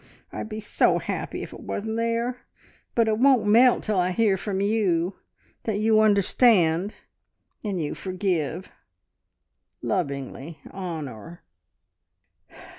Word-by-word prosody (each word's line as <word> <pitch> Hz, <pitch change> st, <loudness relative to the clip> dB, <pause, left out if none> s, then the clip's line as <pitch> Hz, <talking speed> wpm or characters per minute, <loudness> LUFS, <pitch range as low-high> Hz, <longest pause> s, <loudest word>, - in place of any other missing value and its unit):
I'd -, -, -5 dB
be 215 Hz, 0 st, -5 dB
so 210 Hz, -, +2 dB
happy -, -, -4 dB
if -, -, -9 dB
it -, -, -10 dB
wasn't 220 Hz, +2 st, -4 dB
there. 230 Hz, +2 st, -2 dB, 0.5 s
But 230 Hz, -1 st, +3 dB
it 215 Hz, 0 st, +1 dB
won't 260 Hz, -3 st, +5 dB
melt 235 Hz, +4 st, +5 dB
till 210 Hz, -3 st, 0 dB
I 180 Hz, 0 st, +2 dB
hear 205 Hz, +1 st, +2 dB
from 195 Hz, 0 st, -3 dB
you, 195 Hz, -4 st, +1 dB, 0.5 s
that 220 Hz, -3 st, -1 dB
you 215 Hz, +1 st, +3 dB
understand, 200 Hz, -3 st, +3 dB, 0.7 s
and 200 Hz, -4 st, -2 dB
you 150 Hz, -3 st, -2 dB
forgive! 185 Hz, -3 st, -2 dB, 1.1 s
"Lovingly, 140 Hz, -3 st, -3 dB
Honor." 165 Hz, -, -7 dB
200 Hz, 115 wpm, -25 LUFS, 175-220 Hz, 1.1 s, won't